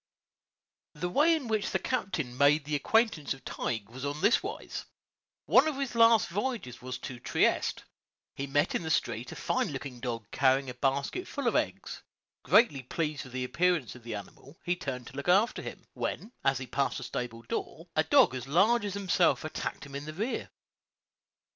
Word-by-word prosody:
The 175 +4 -2
way 315 - +5
in 290 -6 -4
which 215 -2 0
the - - +1
captain 170 - -2
made 140 +2 +4
the 150 - -4
acquaintance 160 - +2
of 135 - -19
Tige 110 -4 -3
was 125 +5 -10
on 145 +1 -2
this 215 - +4
wise: 400 +4 -6 0.6
One - - +6
of 305 -3 -1
his 275 -3 -2
last 230 -1 +6
voyages 200 - -3
was 125 0 -5
to 125 -2 -6
Trieste; - - +1 0.5
he 140 - -4
met 145 +2 +1
in - - 0
the 160 - -4
street - - 0
a - - -7
fine - - 0
looking 125 -3 -6
dog 115 -3 -4
carrying 135 0 +2
a - - -8
basket 140 - -1
full 280 -4 -3
of - - +2
eggs; - - -2 0.4
greatly 210 - +4
pleased 150 +2 -3
with 130 - -12
the 130 0 -2
appearance 160 -1 +1
of 125 - -13
the 115 -1 -5
animal, 130 +8 -10
he 180 - +1
turned 130 -7 -5
to - - -11
look 140 +5 -3
after 200 +6 +4
him, - - -8
when, 220 - -4
as 135 -1 +3
he 130 - -5
passed 135 +3 -1
a - - -7
stable 115 -2 -5
door, 115 - -5
a - - +4
dog - - +5
as 130 0 -5
large 210 +11 +4
as 200 -1 -3
himself 185 -4 +2
attacked 155 -1 -4
him 140 - -12
in 140 +1 -5
the 155 - -6
rear. 215 +10 -3
145 Hz, 195 wpm, -30 LUFS, 130-205 Hz, 0.6 s, One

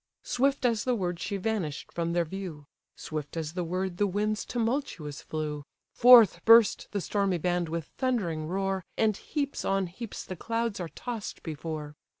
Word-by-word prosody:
Swift 270 +1 +1
as 230 -3 +2
the 250 -1 +1
word 180 -5 -2
she 200 - -2
vanish'd 190 -8 -3
from 170 0 -2
their 170 -1 +2
view; 165 -4 -7 0.3
Swift 155 0 -6
as 160 -1 -3
the 180 0 -2
word 180 +1 -2
the 205 - +2
winds 210 +2 -1
tumultuous 225 - -2
flew; 150 -2 -4 0.3
Forth 240 -4 +8
burst 230 -2 +6
the 205 - -2
stormy 195 -1 0
band 175 0 0
with 165 -1 -3
thundering 185 - 0
roar, 195 +1 -1
And 220 -2 +3
heaps 285 +5 -3
on 195 0 +1
heaps 200 +6 -7
the 185 - -6
clouds 230 +3 -2
are 175 -2 -4
toss'd 235 +1 -6
before. 155 -1 -5
190 Hz, 165 wpm, -29 LUFS, 165-225 Hz, 0.3 s, Forth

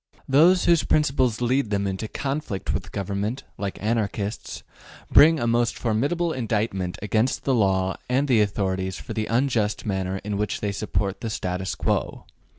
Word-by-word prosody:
Those 165 +7 +5
whose 170 -2 +4
principles 130 -6 +1
lead 125 -1 +1
them 100 -1 0
into 95 +3 -3
conflict 135 -6 -3
with - - -4
government, 100 +6 -3 0.2
like 100 -1 -3
Anarchists, 105 -1 -2 0.5
bring 160 +1 +7
a 120 - -1
most 120 0 +1
formidable 145 +10 0
indictment 105 -6 -2
against 110 +4 0
the 135 - +1
law 95 -4 +1
and 135 +3 +2
the 120 -5 +4
authorities 95 -2 -1
for - - -7
the 110 -1 -2
unjust 115 -3 0
manner 95 -2 -2
in 105 -1 -3
which 105 +1 -2
they 105 - -1
support 100 -1 -2
the 115 - -3
status 95 -2 -3
quo. - - -2
110 Hz, 155 wpm, -24 LUFS, 100-130 Hz, 0.5 s, bring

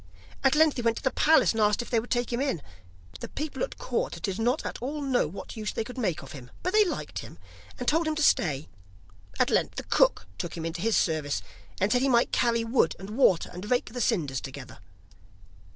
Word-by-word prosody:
At 270 +1 +4
length 310 -2 +4
he - - -1
went 230 -1 +1
to - - -7
the 265 - +2
palace, 320 +1 +4
and 225 - -1
asked 210 +2 +3
if - - -13
they 235 - +3
would 235 - -8
take 240 -1 0
him 240 - 0
in. 265 - -1 0.6
The - - -5
people 305 +1 -5
about - - -3
court - - -2
did 195 -1 -2
not 245 +6 +1
at - - -4
all 285 +5 -3
know 260 - +2
what 175 +9 -8
use 215 -2 -3
they - - -1
could 250 +3 -8
make 175 - -1
of 135 - -11
him, 125 -4 -10
but 365 +2 -1
they 430 0 +6
liked 370 - -4
him, - - -10 0.4
and 250 - -5
told 325 +2 +2
him 310 - 0
to 305 - 0
stay. 150 - +2 0.7
At - - +3
length - - +1
the - - -4
cook - - +2
took 170 0 -4
him 165 - -4
into 165 +1 -4
his 225 +2 +2
service, 155 -4 0 0.4
and 200 +2 +1
said 245 - +3
he 270 - +2
might 240 -1 +3
carry 235 -1 +2
wood 230 -7 +2
and 195 +2 -9
water, 215 -7 +3
and 185 +4 -7
rake 245 -3 0
the 245 - -3
cinders 150 - 0
together. 135 -5 -9
230 Hz, 235 wpm, -27 LUFS, 175-270 Hz, 0.7 s, they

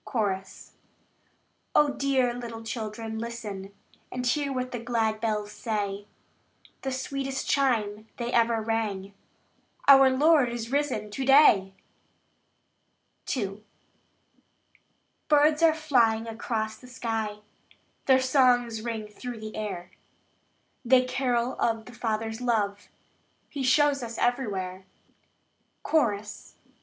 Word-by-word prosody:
Chorus. 195 -5 -3 1.0
Oh, 295 -1 +5
dear 265 -3 +1
little 230 -2 -7
children, 220 -1 -5
listen, 215 -4 -6 0.4
And 250 0 -4
hear 280 +3 +1
what 255 -1 -3
the 245 - -4
glad 225 -2 -1
bells 210 -2 -1
say! 205 -3 -3 0.7
The 265 - -3
sweetest 270 +1 -3
chime 220 -6 +1
they 240 0 -3
ever 230 -1 +2
rang 210 -3 -2 0.7
"Our 270 -1 +8
Lord 285 0 +4
is 235 0 -5
risen 270 -7 -1
to 265 +6 -3
day!" 235 -9 +5 1.6
II. 200 -2 -4 1.6
Birds 300 +1 +4
are 325 -1 +5
flying 240 -8 +2
across 220 -1 -3
the 250 - -15
sky; 225 -3 -3 0.7
Their 260 -1 +6
songs 245 -4 +3
ring 225 -2 -4
through 235 +3 -8
the 215 0 -8
air; 205 -5 -5 0.9
They 255 +1 +4
carol 250 -1 0
of 225 -1 0
the 250 - -12
Father's 225 0 -3
love 205 -4 -1 0.6
He 285 - -5
shows 280 +2 +3
us 230 -1 -6
everywhere. 195 -7 -2 1.0
Chorus. 210 -9 -1
235 Hz, 110 wpm, -27 LUFS, 215-260 Hz, 1.6 s, Our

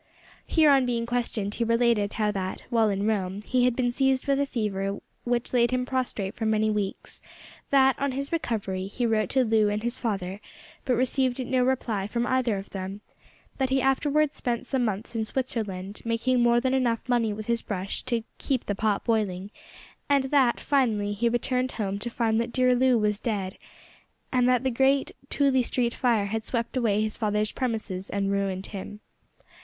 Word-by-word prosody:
Here, 310 -3 +5
on 270 -2 +4
being 235 -1 -1
questioned, 235 -4 -1
he 235 - -1
related 230 -3 +2
how 210 -1 +1
that, 190 -2 -4
while 225 -2 +3
in 200 0 -1
Rome 200 -2 -1
he 250 +2 +2
had 250 -1 +2
been 245 -1 +1
seized 265 +1 +1
with 275 -1 +2
a 280 - +1
fever 200 -5 -2 0.3
which 240 0 -1
laid 240 -1 +4
him 255 0 0
prostrate 250 -7 -2
for 220 - -2
many 215 0 +2
weeks; 205 -2 -4 0.5
that, 270 -1 +4
on 280 -1 0
his 275 +2 -3
recovery, 200 - -2
he 240 +5 -2
wrote 220 -2 +1
to 265 -1 +3
Loo 220 -2 +3
and 210 +1 -2
his 240 +1 -2
father, 195 -3 -3 0.4
but 250 - +2
received 255 +1 0
no 255 0 +1
reply 235 -6 0
from 235 +2 -1
either 250 -5 +1
of 195 - -8
them; 195 +1 -5 0.6
that 265 -1 +1
he 265 +1 +2
afterwards 280 +3 +2
spent 240 0 -2
some 255 0 0
months 215 +1 -3
in 225 - 0
Switzerland, 210 -6 -3
making 235 +2 +1
more 240 0 +4
than 260 +1 0
enough 240 -3 +1
of - - -24
money 235 -3 +2
with 210 +1 -5
his 235 0 0
brush 195 -1 -3
to 235 -2 -1 0.2
"keep 260 -3 -1
the 205 - -1
pot 205 0 0
boiling," 205 -4 -1 0.6
and 280 -1 +4
that, 265 -5 +3
finally, 220 -8 +1
he 235 +3 +1
returned 250 +2 0
home 200 -2 -2
to 240 - -4
find 230 -1 +1
that 235 +1 -4
dear 255 0 +3
Loo 250 0 +4
was 210 -1 +1
dead, 200 -6 -2 0.8
and 250 -1 +3
that 250 0 +3
the 260 - +1
great 270 +3 +2 0.2
Tooley 275 -2 +3
Street 240 -1 0
fire 230 -5 +1
had 220 +2 -2
swept 235 +2 -2
away 215 -4 +2
his 215 -1 -2
father's 210 -1 0
premises 215 -7 -3
and 200 -1 -1
ruined 195 -1 -1
him. 205 +1 -7
235 Hz, 190 wpm, -26 LUFS, 210-255 Hz, 0.8 s, Here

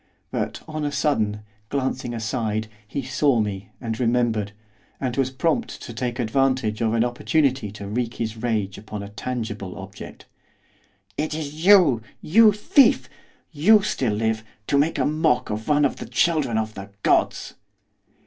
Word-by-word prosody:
But, - - -3
on 155 -1 -4
a 145 - -1
sudden, 110 -8 0 0.3
glancing 130 -3 -2
aside, 110 -1 -2 0.2
he 140 +6 -4
saw 135 -1 +2
me, 100 -2 -3
and 115 -3 -4
remembered, 115 -4 +1 0.5
and 125 -3 -2
was 135 -2 +1
prompt 165 - -1
to 120 - -8
take 120 +1 -3
advantage 125 -2 +1
of 115 0 +1
an 115 - +3
opportunity 130 -1 +1
to 100 -1 -8
wreak 115 +3 -2
his 110 -1 -3
rage 110 -4 -2
upon 105 -1 -7
a 100 - -8
tangible 105 -4 -5
object. 100 +1 -10 0.9
'It 155 0 -1
is 155 0 -5
you! 180 - +6 0.2
you 215 +6 +6
thief! 210 +6 +4 0.4
you 195 +8 +5
still 130 - 0
live! 110 +1 0 0.2
to 140 - +2
make 155 +3 +1
a 130 - +1
mock 150 -6 +1
of 110 +1 -4
one 150 -1 +4
of 140 - -1
the - - -7
children 155 -9 +1
of 110 0 -2
the 100 0 -8
gods! - - +1
120 Hz, 160 wpm, -23 LUFS, 110-145 Hz, 0.9 s, you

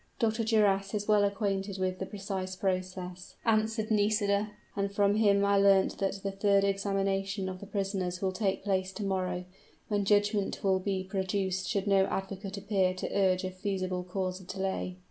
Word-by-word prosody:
"Dr. 225 0 +1
Duras 205 -3 +2
is 205 0 -2
well 210 -1 +5
acquainted 200 -1 -1
with 185 -1 -1
the 190 - -3
precise 195 -2 -4
process," 185 -1 -3
answered 220 0 +1
Nisida; 205 -1 +2 0.3
"and 200 0 -1
from 200 0 +3
him 200 -2 +4
I 200 0 +4
learnt 195 -1 +4
that 195 -1 -2
the 195 - -1
third 195 0 +3
examination 195 0 0
of 185 0 -5
the 200 - -9
prisoners 195 -3 -2
will 190 0 0
take 190 0 -1
place 190 -2 0
to 210 - -5
morrow, 185 -2 -1 0.4
when 205 -1 +1
judgment 205 0 +1
will 190 -1 +3
be 190 0 -1
pronounced 190 -1 -1
should 200 -1 0
no 195 -1 +4
advocate 195 +1 -4
appear 190 -2 +1
to 185 - -4
urge 190 -2 +3
a 185 - -2
feasible 185 -1 -2
cause 185 0 -3
of 185 - -15
delay." 190 -1 -3
195 Hz, 175 wpm, -30 LUFS, 185-205 Hz, 0.4 s, well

